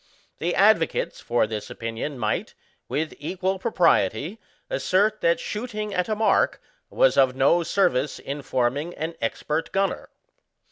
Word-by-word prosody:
The - - -1
advocates - - +3
for 120 -1 +1
this 110 -1 -5
opinion 115 +5 -5
might, 110 -3 -2 0.3
with 155 +1 -2
equal 190 +5 -2
propriety, 170 - +1 0.3
assert 215 - +1
that 170 0 +3
shboting 215 -2 -4
at 180 +3 -1
a 215 - +1
mark 220 +1 +2 0.3
was - - +3
of 130 -1 +4
no 135 +6 +4
service 165 -6 +1
in 140 +2 -6
forming 135 +6 -1
an 160 +2 -4
expert 150 +7 -2
gunner. 195 0 -1
165 Hz, 135 wpm, -24 LUFS, 130-195 Hz, 0.3 s, of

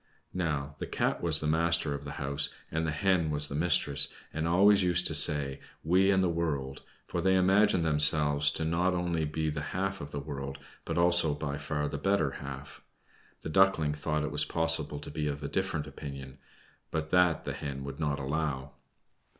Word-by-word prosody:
Now 75 -5 -3
the - - -5
Cat - - -1
was 80 -3 +5
the - - -3
master 80 -1 +1
of 70 0 -7
the 70 - -6
house, 70 +1 -2 0.2
and 80 +1 -1
the - - -1
Hen 85 +1 +1
was 75 -1 -1
the - - -6
mistress, 75 -3 +2 0.3
and 80 +1 -2
always 100 +4 +5
used 90 -1 +1
to - - +2
say, 75 -2 +5 0.2
"We 95 +4 +3
and 95 -1 +3
the - - +2
world," 75 -6 -3 0.2
for 85 - -3
they 95 +2 +2
imagined 95 -1 +3
themselves 75 -1 +5
to - - -3
be - - -1
not 90 +2 +1
only 85 -2 -1
the 75 0 -3
half 95 +5 -3
of 70 - -7
the 75 - -5
world, 70 -1 -6 0.3
but - - -3
also 85 -3 +2
by 70 -1 -4
far 75 -1 -3
the 70 - -5
better 95 -4 +1
half. 70 0 -9 0.6
The - - -6
Duckling 80 -4 +3
thought 75 +1 -2
it 75 - -3
was 75 0 +2
possible 80 -1 -1
to 75 - -8
be 75 0 -3
of 70 0 -4
a - - -3
different 90 -3 -2
opinion, 70 -2 -9 0.5
but 80 0 -4
that 90 -3 +3
the - - -3
Hen 70 -1 -6
would 70 +1 -8
not 75 -3 -1
allow. 70 -1 -3
75 Hz, 195 wpm, -29 LUFS, 70-85 Hz, 0.6 s, was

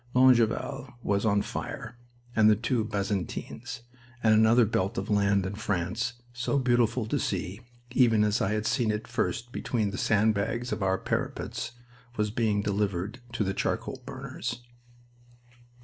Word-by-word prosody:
Longueval 130 +1 +3
was 100 +2 +1
on 100 -1 +3
fire, 110 +2 -5 0.4
and 110 -1 +6
the 105 - +6
two 115 +1 0
Bazentins, 105 +3 -3 0.4
and 110 -1 +6
another 110 +2 +6
belt 100 -2 -1
of 95 +2 -2
land 100 -1 +3
in 95 - -3
France, 105 +2 -1 0.2
so 120 +4 0
beautiful 120 -3 +2
to 110 - -1
see, 95 +6 -2 0.3
even 115 -4 +4
as 105 +1 +1
I 100 - +1
had 105 0 -1
seen 120 -1 +1
it 105 0 -2
first 120 0 -2
between 110 -5 -1
the - - -4
sand 110 +1 +3
bags 115 +4 -2
of - - -2
our 95 0 +2
parapets, 120 +4 -3 0.4
was 105 -1 +1
being 105 -3 +1
delivered 100 +2 -1
to 115 - 0
the 95 -1 -1
charcoal 130 +6 -2
burners. 130 -2 -5
110 Hz, 150 wpm, -28 LUFS, 100-120 Hz, 0.4 s, and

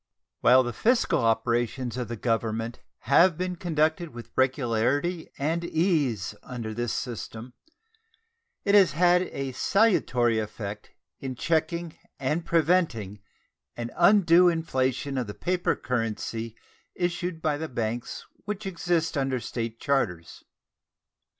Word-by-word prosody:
While 130 +1 +6
the 120 -1 -4
fiscal 240 - +2
operations 120 +2 0
of 125 -1 -3
the 120 - -4
Government 115 0 -2 0.2
have 165 +4 +4
been 180 0 -2
conducted 160 -2 0
with 120 - -9
regularity 130 +6 +1
and 160 +4 -1
ease 155 - 0
under 115 -3 -6
this 120 0 -2
system, 120 -1 -5 1.1
it 200 - +2
has 195 -6 +6
had 175 +3 +4
a 135 -7 -4
salutary 125 - +2
effect 105 -1 -6 0.3
in 130 -1 -5
checking 165 +3 -1 0.2
and 150 +5 -1
preventing 155 - +1 0.6
an 120 0 -4
undue 175 -1 +6
inflation 135 -4 -1
of 125 - -3
the 105 - -7
paper 180 0 0
currency 115 -1 -3 0.4
issued 175 -1 -2
by 155 -2 0
the 160 +1 -5
banks 120 0 -4 0.2
which 210 0 -4
exist 170 -3 -1
under 135 -2 0
State 115 0 -5
charters. 95 - -1
135 Hz, 120 wpm, -26 LUFS, 115-170 Hz, 1.1 s, While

